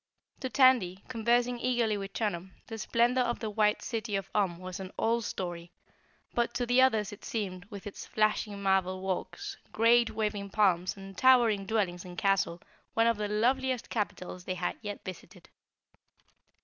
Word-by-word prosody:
To 260 - -3
Tandy, 220 -7 +4
conversing 240 +1 +1
eagerly 240 -4 +1
with 195 -1 -5
Chunum, 190 -4 -2
the 225 -1 -7
splendor 240 +4 +2
of 240 -1 0
the 220 -3 -4
White 210 0 +2
City 220 -3 -3
of 195 -1 -3
Om 190 -5 +1
was 185 +1 -7
an 190 -1 -7
old 230 0 +1
story, 175 -2 -5 0.6
but 235 0 0
to 245 - 0
the 245 +2 +4
others 220 -6 +3
it 205 - -13
seemed, 190 -5 -4
with 200 -2 -10
its 205 - -8
flashing 215 -1 0
marble 190 -1 +1
walks, 185 -2 -4
great 235 +1 +4
waving 210 -2 -2
palms 190 -3 +2
and 195 0 -10
towering 230 -5 +4
dwellings 190 -5 0
and 180 -1 -10
castle, 195 -3 +1 0.3
one 225 - +4
of 230 -2 +3
the 210 0 -2
loveliest 250 +4 0
capitals 185 -4 -3
they 185 - -2
had 175 0 -2
yet 205 -2 -6
visited. 185 -3 -10
210 Hz, 165 wpm, -30 LUFS, 190-235 Hz, 0.6 s, Tandy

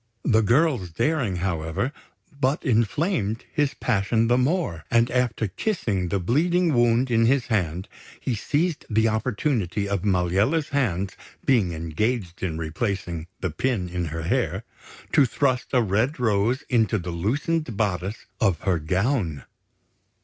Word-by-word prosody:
The 110 -3 +4
girl's 120 - +2
daring, 125 - 0
however, 85 - -2 0.4
but 140 +3 -1
inflamed 115 - 0
his 145 -2 +1
passion 115 0 +1
the 120 - +4
more; 130 - 0
and 115 0 +3
after 120 -3 0
kissing 100 - -1
the 100 - 0
bleeding 165 - +2
wound 120 +1 +3
in 115 -1 +4
his 130 0 +2
hand, 90 -5 -1 0.3
he 130 - -2
seized 150 - -1
the 110 0 +3
opportunity 110 - -1
of 100 -2 -1
Maliella's 100 - +1
hands 100 -9 -1 0.3
being 110 -10 +3
engaged 85 +4 -2
in 85 -4 -2
replacing 85 0 -3
the 95 - -1
pin 100 +2 -1
in 90 0 -2
her 80 0 -4
hair, 85 - 0 0.5
to - - +5
thrust 130 -1 0
a 125 -3 +3
red 110 - 0
rose 110 +2 +1
into 110 -3 +2
the 90 -2 -4
loosened 130 - -1
bodice 100 0 -2
of 95 -7 +2
her 95 -4 +1
gown. 90 - 0
110 Hz, 140 wpm, -24 LUFS, 90-130 Hz, 0.5 s, to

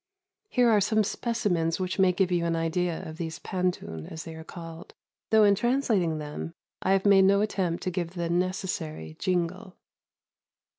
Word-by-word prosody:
Here 250 - +3
are 210 -2 +4
some 215 +2 +2
specimens 190 -8 -1
which 185 +1 -2
may 190 -1 +5
give 180 0 +1
you 175 -1 +1
an 165 0 +1
idea 165 +1 -1
of 160 0 -8
these 160 -2 -4
pantun, 180 - -3
as 160 0 -6
they 165 - -8
are 160 0 -9
called, 165 0 -10 0.3
though 220 -1 +6
in 205 -1 +6
translating 220 - +1
them 150 +2 -6 0.3
I 190 - +2
have 195 0 +1
made 195 -1 +6
no 200 +1 +4
attempt 185 -5 -1
to 185 - -1
give 175 0 -3
the 170 -1 -2
necessary 170 - -2
"jingle." 180 +1 -2
180 Hz, 170 wpm, -27 LUFS, 165-195 Hz, 0.3 s, though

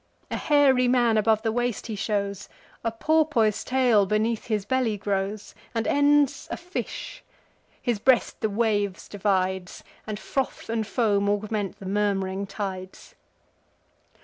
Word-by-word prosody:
A - - -1
hairy 275 -4 +4
man 240 -2 +3
above 220 0 +2
the 225 - +1
waist 245 -1 -1
he 220 - -4
shows; 200 -1 -2 0.3
A 230 - 0
porpoise 275 -4 +2
tail 245 -6 +3
beneath 215 +2 0
his 210 -4 -1
belly 255 -4 0
grows; 200 +1 -3 0.2
And 225 0 0
ends 285 -1 +3
a - - -3
fish: 360 +2 -6 0.6
his 235 -4 -1
breast 255 +3 +2
the 220 - +1
waves 205 -3 0
divides, 190 -2 -1 0.2
And 215 -1 -3
froth 265 +1 -3
and 225 -2 -1
foam 205 -4 +1
augment 205 -1 -2
the 195 - -11
murm'ring 195 -1 -1
tides. 190 -2 -6
215 Hz, 135 wpm, -25 LUFS, 200-245 Hz, 0.6 s, hairy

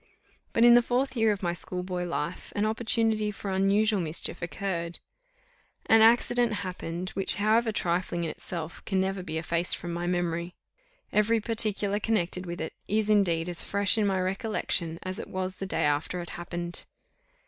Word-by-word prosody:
But 230 - +3
in 240 - +9
the 240 - +7
fourth 255 +3 0
year 225 -2 +3
of 200 -2 -3
my 170 -1 0
schoolboy 180 0 -4
life, 170 0 -4
an 205 - +1
opportunity 220 -1 +1
for 200 -1 -5
unusual 200 +2 +2
mischief 165 +1 -3
occurred. 170 0 -3 0.9
An 225 0 +6
accident 240 +1 +4
happened, 180 0 -5
which, 195 0 +3
however 220 +2 +2
trifling 175 -3 -1
in 165 - -2
itself, 170 -2 -6
can 190 - 0
never 190 0 -1
be 160 -3 -4
effaced 170 +2 +1
from 175 -1 -5
my 175 +1 -3
memory. 175 0 -1 0.6
Every 220 +2 +3
particular 210 -2 0
connected 185 -4 0
with 170 0 -5
it, 160 - -4
is 215 +1 +1
indeed 175 -5 +3
as 175 -1 0
fresh 200 +1 +2
in 215 -2 +2
my 190 -1 +1
recollection 185 -3 -1
as 185 +3 -4
it - - -6
was 185 0 -3
the 195 - -4
day - - 0
after 150 +4 0
it 175 - -6
happened. 175 0 -5
190 Hz, 170 wpm, -28 LUFS, 175-215 Hz, 0.9 s, in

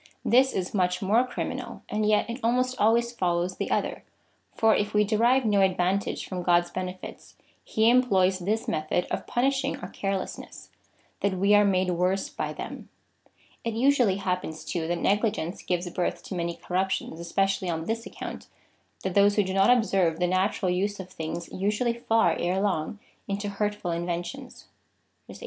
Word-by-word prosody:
This 260 +3 +5
is 185 -1 -3
much 180 -1 +1
more 215 +6 +4
criminal, 245 - -5
and 210 0 -1
yet 210 0 +3
it 235 +2 -5
almost 250 +2 +1
always 235 +2 +3
follows 180 -4 -1
the - - -3
other, - - -1 0.5
for 225 -1 +4
if 205 0 -1
we 210 - +5
derive 235 +5 +3
no 205 -2 +3
advantage 190 +1 +1
from 185 -1 -4
God's 175 0 +2
benefits, 185 0 -7 0.3
he 220 +1 +1
employs 195 -7 +4
this 210 +5 -1
method 155 +3 0
of - - -3
punishing 270 +2 0
our - - -8
carelessness 195 -1 -5 0.2
— - - -37
that 200 -1 +1
we 200 +3 +3
are 205 0 +7
made 185 -2 +2
worse 180 +2 0
by - - -4
them. - - -8 0.7
It 230 -1 -2
usually 245 -5 +3
happens, 180 -5 -3
too, 165 -2 -2
that 175 +1 0
negligence 205 -4 0
gives 180 0 -2
birth 180 - -2
to - - -7
many 170 -1 -2
corrup 185 +3 -1
tions, 165 -3 -3
especially 195 +2 0
on 160 -1 -2
this 230 +3 -3
account, - - -8 0.6
that 190 - -2
those 205 +1 +5
who 210 - +3
do 190 0 -3
not 195 +4 +4
ob 245 -3 +5
serve 180 -6 +1
the 180 - +2
natural 185 +1 +1
use 200 +3 -1
of 185 -1 -8
things 165 0 -5
usually 210 +5 0
fall 225 -1 +2
erelong 185 0 0 0.3
into 200 0 -2
hurt 205 +1 -1
ful 180 -4 -4
inventions.^ 175 +10 -5 0.6
18. - - -10
195 Hz, 175 wpm, -27 LUFS, 180-220 Hz, 0.7 s, are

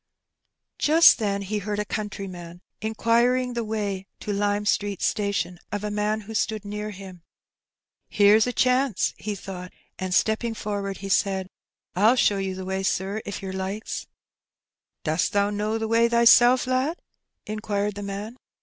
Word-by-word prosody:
Just 320 0 +6
then 200 -2 -1
he 210 +2 -2
heard 205 +1 -3
a 210 - -1
countryman 185 -5 -6 0.2
inquiring 235 +3 +1
the 235 -1 -2
way 205 -3 -3
to 210 - -3
Lime 205 +1 0
Street 205 -2 0
Station, 200 -4 -1
of 205 0 -3
a 210 - -2
man 210 +1 0
who 220 - -8
stood 215 -1 -1
near 210 +1 -4
him. 190 -3 -10 0.9
''Here's 210 +2 +5
a - - 0
chance," 255 -2 +1
he 210 -1 -4
thought; 180 -1 -8 0.3
and, 185 -1 -3
stepping 220 +4 +1
forward, 200 -2 -4
he - - -4
said, 190 -1 +1 0.2
" - - -48
I'll 215 +7 +5
show 205 -5 +3
you 190 -1 -2
the 190 0 -6
way, 190 0 -2
sir, 195 +3 -1
if 200 0 -6
yer 190 -1 -4
likes." 190 +3 -4 1.0
"Dost 160 +2 0
thee 200 0 +2
know 210 +2 -1
th' 225 0 -2
way 230 +1 +3
thysel', 240 +2 +6
lad?" 260 +6 0 0.5
inquired 210 -1 -2
the 205 - -7
man. 205 +4 -6
205 Hz, 160 wpm, -25 LUFS, 195-220 Hz, 1.0 s, Just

